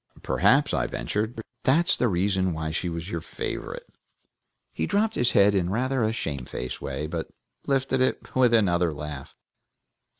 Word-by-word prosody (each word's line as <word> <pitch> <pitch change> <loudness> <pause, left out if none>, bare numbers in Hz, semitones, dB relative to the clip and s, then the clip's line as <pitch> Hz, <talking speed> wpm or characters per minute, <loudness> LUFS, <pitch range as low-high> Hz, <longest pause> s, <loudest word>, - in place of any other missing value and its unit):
"Perhaps," - - +3
I - - +1
ventured, 110 +2 -3 0.2
"that's 165 +7 +4
the 125 - +1
reason 95 -1 +1
why 80 0 -3
she 85 +2 -1
was 85 +3 -5
your 85 - -2
favorite." - - -5 0.9
He 80 - -2
dropped 220 +2 +1
his 120 - +1
head 100 0 +5
in 90 -3 +1
rather 130 +5 0
a 110 -1 +2
shamefaced 65 - -4
way, 75 - -3
but 80 +1 -4 0.4
lifted 135 -1 +1
it 130 - -1
with 125 -2 +4
another 90 -6 +3
laugh. 75 -1 -7
100 Hz, 155 wpm, -26 LUFS, 80-125 Hz, 0.9 s, head